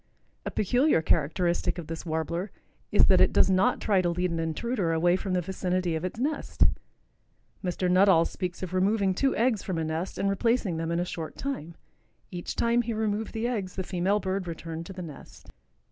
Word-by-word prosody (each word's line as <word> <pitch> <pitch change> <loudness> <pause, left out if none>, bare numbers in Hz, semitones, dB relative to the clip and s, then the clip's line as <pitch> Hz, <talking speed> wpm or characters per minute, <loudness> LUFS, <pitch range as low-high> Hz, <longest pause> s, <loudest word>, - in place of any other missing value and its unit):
A - - 0
peculiar 245 - +2
characteristic 170 +4 +1
of 175 - -5
this 165 +2 -7
Warbler 170 +4 -2 0.4
is - - +6
that - - +5
it - - +5
does - - +4
not 185 +1 +3
try 200 -3 +2
to 175 - +1
lead 180 +1 -1
an 165 - -2
intruder 170 +4 -1
away 175 +2 +3
from 190 0 -3
the 180 - +2
vicinity 185 -1 -1
of 160 - -3
its 185 +5 -4
nest. 295 +4 0 1.0
Mr. 180 0 -1
Nuttall 180 -2 +5
speaks 180 -1 -4
of 185 -1 -5
removing 195 +1 +2
two 270 +8 +1
eggs 230 -3 +2
from 185 -3 -3
a 165 - 0
nest 160 +4 -3
and 200 - 0
replacing 200 -2 +1
them 165 0 -2
in 170 0 0
a 175 - 0
short 165 -3 -6
time. 170 - -4 0.6
Each 175 -1 -5
time 235 +1 +2
he 235 -1 -3
removed 215 0 -2
the 225 0 -2
eggs 205 -7 -3
the 190 - -2
female 190 +3 0
bird 190 -1 -2
returned 165 0 -6
to - - -8
the 185 -1 -6
nest. 150 -4 -12
185 Hz, 200 wpm, -27 LUFS, 170-205 Hz, 1.0 s, is